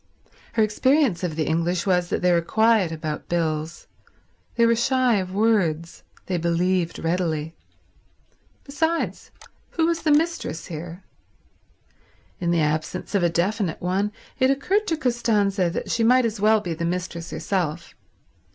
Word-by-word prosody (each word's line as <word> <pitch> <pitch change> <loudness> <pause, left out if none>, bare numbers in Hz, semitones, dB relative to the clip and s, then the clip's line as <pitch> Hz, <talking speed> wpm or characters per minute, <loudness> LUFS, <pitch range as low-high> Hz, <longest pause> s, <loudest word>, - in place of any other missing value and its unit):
Her 225 - +3
experience 255 - +2
of 170 -4 -2
the 155 -1 -1
English 170 +3 0
was 180 -2 +1
that - - -2
they 180 - +4
were 170 -1 +3
quiet 220 -1 +2
about 155 -2 -5
bills. 160 -1 -2 0.7
They 235 - +4
were 230 0 +4
shy 250 -1 +2
of 185 -1 -3
words. 185 -6 0 0.2
They 185 - -1
believed 170 +1 0
readily. 165 -2 -1 1.1
Besides, 320 +4 -2 0.5
who 325 - +3
was 335 0 0
the 315 - 0
mistress 310 - 0
here? 170 +3 -8 1.4
In 175 -2 -1
the 170 -1 +2
absence 155 +6 -2
of 200 - +2
a 175 - +3
definite 185 +1 -1
one, 190 +4 -1 0.3
it 260 0 +4
occurred 380 +11 +1
to 325 - 0
Costanza 215 - +1
that 170 - -4
she 230 - +1
might 250 +2 +5
as 220 -2 -2
well 215 +1 +4
be 175 -4 -3
the 165 +1 -5
mistress 175 -1 -3
herself. 170 -4 -3
185 Hz, 150 wpm, -23 LUFS, 170-230 Hz, 1.4 s, might